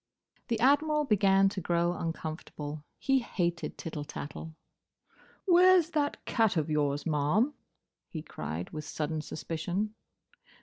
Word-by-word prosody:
The 230 -3 0
Admiral 300 +4 +4
began 195 -4 +4
to 195 -1 -5
grow 170 +1 +1
uncomfortable. 155 -3 -5
He 270 -1 +2
hated 175 -8 -2
tittle 155 -2 -5
tattle. 150 +2 -7 0.9
"Where's 360 -2 +6
that 290 -2 -1
cat 225 -6 +2
of 155 0 0
yours, 145 -1 +1
ma'am?" 165 - +2 0.6
he 155 -2 -6
cried, 80 - -5
with 155 -1 -5
sudden 155 +1 -3
suspicion. 175 +7 -3
175 Hz, 120 wpm, -30 LUFS, 155-235 Hz, 0.9 s, Where's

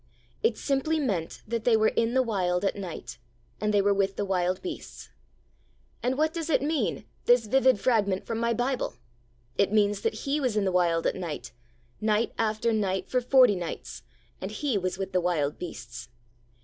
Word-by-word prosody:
It 225 - +2
simply 290 +3 0
meant 195 - -2
that 230 0 -2
they 230 -2 +4
were 220 0 +4
in 230 +2 0
the 260 - +4
Wild 185 -5 0
at - - +1
night, 185 -10 -7 0.4
and 210 0 0
they 205 -1 +3
were 200 0 +4
with 195 0 0
the 205 - -2
wild 185 -1 0
beasts. 345 -3 -7 0.9
And 255 +2 0
what 315 +1 +2
does 330 -1 -4
it 285 - +2
mean, 305 +1 -1 0.2
this 245 -1 +5
vivid 260 0 +4
fragment 205 -6 +1
from 225 -1 -3
my 235 0 +1
Bible? 245 - -1 0.6
It 200 - +3
means 205 -1 +2
that 225 - -2
He 280 +2 +1
was 250 -6 0
in 205 - +2
the 190 - +1
Wild 170 -2 +2
at - - +2
night, 155 -9 -5 0.5
night 215 +1 +1
after 220 +1 +1
night 190 -3 -1
for 255 - +2
forty 250 -3 +5
nights, 175 -3 -6 0.4
and - - -3
He 285 -6 -2
was 185 -2 -1
with 195 -1 -4
the 185 - +2
wild 155 -5 0
beasts. 120 -8 -8
210 Hz, 190 wpm, -27 LUFS, 185-250 Hz, 0.9 s, this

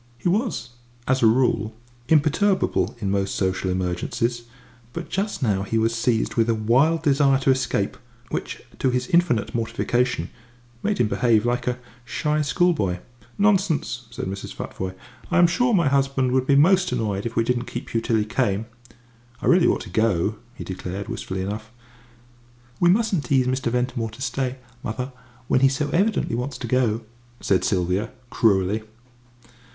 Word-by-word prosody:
He - - -3
was, 195 - 0 0.4
as 130 0 +2
a 115 - +6
rule, 110 -2 +2 0.3
imperturbable 160 +6 +2
in 100 -3 -1
most 100 -1 0
social 95 0 0
emergencies, 95 +6 -2 0.5
but 170 - -6
just 200 -5 -2
now 100 -5 +1
he 100 +3 -1
was 115 +1 +2
seized 115 0 0
with 115 0 +2
a 115 - +3
wild 135 +10 +2
desire 140 -2 +4
to 135 - +4
escape, 130 0 0 0.3
which, - - -4 0.2
to 130 - +2
his 125 0 0
infinite 170 -11 +2
mortification, 120 +2 -1 0.5
made 210 0 0
him 120 - +2
behave 115 0 +2
like 120 0 -1
a 125 0 0 0.3
shy 150 +4 -1
schoolboy. 150 - +1 0.4
"Nonsense!" 180 - +1
said 125 +2 -5
Mrs. 95 +1 -6
Futvoye; 95 0 -5 0.3
"I 180 - +1
am 175 - +7
sure 245 +9 +2
my 170 -8 +3
husband 135 -2 +1
would 130 0 +1
be 140 - +4
most 180 +4 +4
annoyed 110 -3 -1
if 115 - -8
we 115 - +3
didn't 125 +1 0
keep 120 +3 -6
you 115 - +1
till 115 0 0
he 105 -1 +2
came." 110 -2 0 0.7
"I - - -6
really 175 0 +5
ought - - +1
to - - -9
go," 110 -2 +1 0.2
he - - -7
declared, 95 +1 -6
wistfully 95 0 -4
enough. 105 +3 -5 1.1
"We 175 - +4
mustn't 195 - +2
tease 130 0 +2
Mr. 130 -1 -1
Ventimore 125 -2 -1
to 110 +4 -13
stay, 130 0 -2 0.3
mother, 125 +3 -4 0.4
when - - +3
he 135 0 +5
so 145 +2 -1
evidently 205 - +1
wants 125 +4 -3
to - - -5
go," 120 -4 +1 0.4
said 95 -2 +1
Sylvia, 95 +3 0 0.2
cruelly. 100 -2 +2
125 Hz, 165 wpm, -23 LUFS, 110-145 Hz, 1.1 s, am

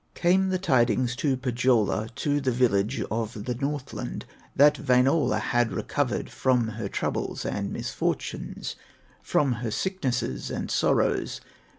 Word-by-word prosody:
Came 190 +2 +3
the 185 - +1
tidings 125 - +2
to 135 -2 +1
Pohyola, 120 -4 +1
To 145 0 0
the 135 - 0
village 115 -2 +1
of 110 -1 -3
the 125 - -1
Northland, 135 - -4 0.3
That 145 +1 +5
Wainola 130 +2 +4
had 120 -1 +1
recovered - - -2
From 125 -3 +1
her 110 -2 -5
troubles - - -2
and - - -2
misfortunes, - - -3 0.5
From 140 -3 +1
her 120 - -2
sicknesses 125 - -2
and - - -4
sorrows. - - +1
125 Hz, 125 wpm, -26 LUFS, 115-140 Hz, 0.5 s, That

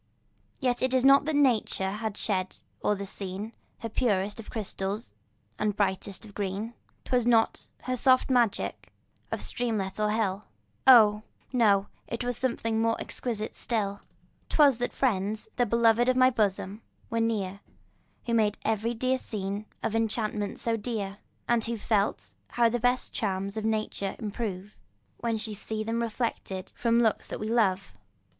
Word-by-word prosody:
Yet 250 -3 0
it 260 0 +2
was 260 0 +3
not 275 +1 +7
that 310 -1 0
nature 230 -8 +2
had 215 0 -4
shed 190 -3 -1 0.3
o'er 210 - +3
the 200 0 -5
scene 195 +3 -5 0.3
Her 230 - -3
purest 205 -3 0
of 225 - -9
crystal 200 -2 -2 0.6
and 210 -2 0
brightest 195 +1 -1
of 205 - -13
green; 205 +3 -3 0.3
'Twas 245 -2 +1
not 230 -2 +3 0.2
her 255 - -1
soft 255 +1 +4
magic 240 -5 +1 0.4
of - - -2
streamlet 215 -5 -1
or 210 0 +2
hill, 210 -2 0 0.4
Oh! 215 -5 +8 0.3
no—it 225 +1 +1
was 245 0 -1
something 230 -3 0
more 225 0 +1
exquisite 220 -3 -4
still. 205 -4 -2 0.5
'Twas 280 -6 +5
that 245 - -1
friends, 215 -4 0
the 245 -1 +3
beloved 235 +2 +4
of 255 - +2
my 255 0 +6
bosom, 205 -2 0 0.3
were 230 0 +1
near, 200 -4 -1 0.7
Who 235 - -1
made 215 -2 +2
every 220 +2 0
dear 255 +3 +1
scene 205 -1 -4 0.2
of 225 - -1
enchantment 215 -2 -1
more 230 -1 +1
dear, 205 -3 -4 0.3
And 235 -2 +2
who 235 0 -2
felt 210 -1 0 0.2
how 235 -1 +3
the 240 +1 -1
best 245 +2 +1
charms 195 -1 -2
of 220 0 -3
nature 215 -3 -1
improve, 210 -2 -5 0.4
When 235 -1 -1
we 215 0 -2
see 215 +1 -4
them 225 +1 -1
reflected 225 -5 -3
from 235 0 +3
looks 220 - +1
that - - -5
we 215 - -3
love. 195 - +1
220 Hz, 155 wpm, -28 LUFS, 205-235 Hz, 0.7 s, Oh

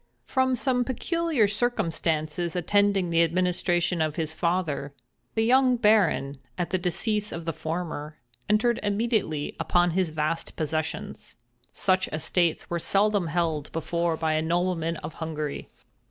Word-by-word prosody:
From 260 -1 +1
some 250 0 +1
peculiar 305 - +1
circumstances 170 -7 -1
attending 195 0 +2
the 165 0 +4
administration 175 0 +1
of 155 -1 0
his 160 -2 -2
father, 160 -5 -1 0.4
the 220 - +2
young 255 +1 +5
Baron, 200 - +3 0.2
at 175 -3 -2
the 185 - +1
decease 210 +4 0
of 165 0 -6
the 165 - -1
former, 155 -1 -4 0.3
entered 225 +3 +3
immediately 205 -8 -1
upon 175 0 +2
his 185 0 +1
vast 155 +1 -2
possessions. 155 0 -4 0.4
Such 185 -1 +1
estates 165 +2 0
were 170 - -2
seldom 200 0 +2
held 160 -2 -1
before 165 +1 -1
by 160 -1 0
a 155 - +1
nobleman 165 0 0
of 150 +1 -7
Hungary. 155 -2 -4
175 Hz, 135 wpm, -26 LUFS, 160-205 Hz, 0.4 s, young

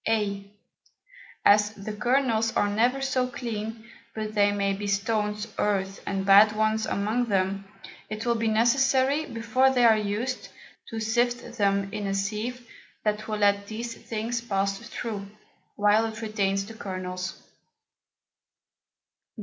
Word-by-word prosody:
[a] 200 -3 -1 1.0
As 210 +1 +5
the 205 +1 -6
Kernels 235 -1 +1
are 205 - +3
never 245 +6 +1
so 260 -2 +1
clean, 225 -2 -5 0.3
but 215 -1 -4
there 205 -1 +4
may 200 -1 0
be 205 +1 -4
Stones, 210 +1 -1
Earth, 195 -1 0
and 195 -1 -1
bad 205 +2 +7
ones 215 0 +1
among 220 +5 0
them; 195 -2 0 0.5
it 215 +2 -5
will 235 - +3
be 230 -1 -1
necessary, 265 +6 +3
before 230 +3 +2
they 250 -2 +3
are 225 -1 +7
used, 215 +5 -2 0.4
to 225 - -4
sift 240 +2 0
them 200 0 +1
in 205 -1 -3
a 195 - -1
Sieve 220 +5 -3 0.4
that 210 0 -1
will 215 -1 -2
let 200 -1 +2
these 230 +2 -5
things 230 +1 -4
pass 195 -3 -1
through, 225 -3 -5 0.5
while 210 +2 +3
it 220 0 -7
retains 195 -3 -1
the 225 - -10
Kernels. 185 -3 -5
215 Hz, 140 wpm, -26 LUFS, 200-235 Hz, 1.0 s, bad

